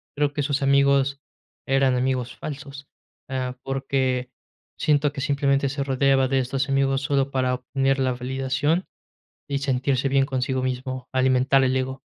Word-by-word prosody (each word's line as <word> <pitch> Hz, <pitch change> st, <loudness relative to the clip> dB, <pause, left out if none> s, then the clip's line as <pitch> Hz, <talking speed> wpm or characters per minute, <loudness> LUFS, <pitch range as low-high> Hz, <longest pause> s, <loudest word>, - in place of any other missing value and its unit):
creo 145 Hz, 0 st, 0 dB
que 145 Hz, -, -1 dB
sus 140 Hz, -1 st, -1 dB
amigos 140 Hz, 0 st, +3 dB, 0.5 s
eran 135 Hz, -1 st, +3 dB
amigos 125 Hz, -1 st, -1 dB
falsos. 140 Hz, -1 st, -8 dB, 0.4 s
Eh, 130 Hz, -1 st, -2 dB
porque 130 Hz, -2 st, -1 dB, 0.5 s
siento 145 Hz, -1 st, +2 dB
que 140 Hz, -, -6 dB
simplemente 140 Hz, -1 st, +1 dB
se 140 Hz, 0 st, -2 dB
rodeaba 135 Hz, 0 st, +2 dB
de 135 Hz, 0 st, +2 dB
estos 135 Hz, +2 st, -1 dB
amigos 135 Hz, 0 st, +1 dB
solo 140 Hz, -1 st, 0 dB
para 130 Hz, -1 st, +1 dB
obtener 135 Hz, +2 st, 0 dB
la 130 Hz, -1 st, +1 dB
validación 130 Hz, +7 st, -1 dB, 0.6 s
y 140 Hz, -1 st, -1 dB
sentirse 135 Hz, 0 st, 0 dB
bien 135 Hz, 0 st, +3 dB
consigo 130 Hz, -1 st, -1 dB
mismo, 130 Hz, 0 st, -4 dB
alimentar 130 Hz, +1 st, +3 dB
el 130 Hz, 0 st, +1 dB
ego. 130 Hz, 0 st, -2 dB
135 Hz, 150 wpm, -24 LUFS, 130-140 Hz, 0.6 s, amigos